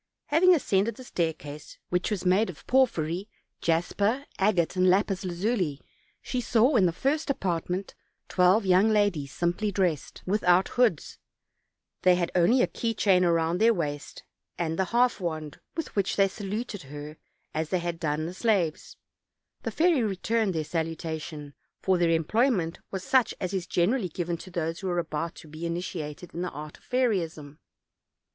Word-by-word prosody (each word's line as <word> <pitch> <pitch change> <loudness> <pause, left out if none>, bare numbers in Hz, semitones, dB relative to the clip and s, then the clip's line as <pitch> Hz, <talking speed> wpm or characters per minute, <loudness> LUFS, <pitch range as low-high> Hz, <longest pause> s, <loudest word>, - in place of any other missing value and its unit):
Having 355 +4 +6
ascended 210 - +1
the 255 - -10
stair 170 -9 0
case, 150 -1 -10
which 180 0 0
was 205 -4 -3
made 190 +4 +3
of 170 - -10
porphyry, 195 -7 +1 0.3
jasper, 200 +10 +1
agate 190 -4 +2
and 185 0 +4
lapis 195 +1 +2
lazuli, 180 - -1 0.4
she 250 - -2
saw 245 +4 +3
in 195 -6 +5
the - - +1
first 285 - -1
apartment 185 -4 -2 0.3
twelve 185 +4 +3
young 190 +3 +5
ladies 205 -10 +1
simply 175 +5 -1
dressed, 180 -7 -1
without 185 -2 +3
hoods; 230 - +1 0.8
they 180 0 +5
had 175 -1 -1
only 215 +9 +4
a - - +2
key 230 -1 -2
chain 190 -3 +4
round 170 +1 +1
their 230 0 +5
waist, 145 -4 -4 0.3
and 165 0 -2
the 190 - +3
half 240 +3 +2
wand, 155 -5 -4 0.2
with 325 - -4
which 200 -2 +1
they 195 -1 +4
saluted 205 +2 -5
her 150 +2 -9 0.4
as 155 0 -2
had 175 -2 -2
done 155 -1 -1
the 170 - -5
slaves; 190 -6 0 0.6
the - - -3
fairy 330 -4 +3
re 210 -4 0
turned 215 -1 0
their 160 - 0
salutation, 160 -2 -4 0.3
for 185 -2 +1
their 170 -1 +3
employment 170 - +1
was 190 -1 -5
such 255 +4 +2
as 185 +1 -3
is 185 -3 -2
generally 185 +4 +1
given 170 +1 -3
to 170 - -10
those 170 -2 -3
who 190 - -3
are 175 - -1
about 165 0 -2
to 160 - -12
be 155 +2 -9
initiated 170 -1 -5
in 170 - -4
the 180 - -2
art 150 +1 -9
of - - -29
fairyism. 170 - -1
180 Hz, 165 wpm, -27 LUFS, 165-210 Hz, 0.8 s, Having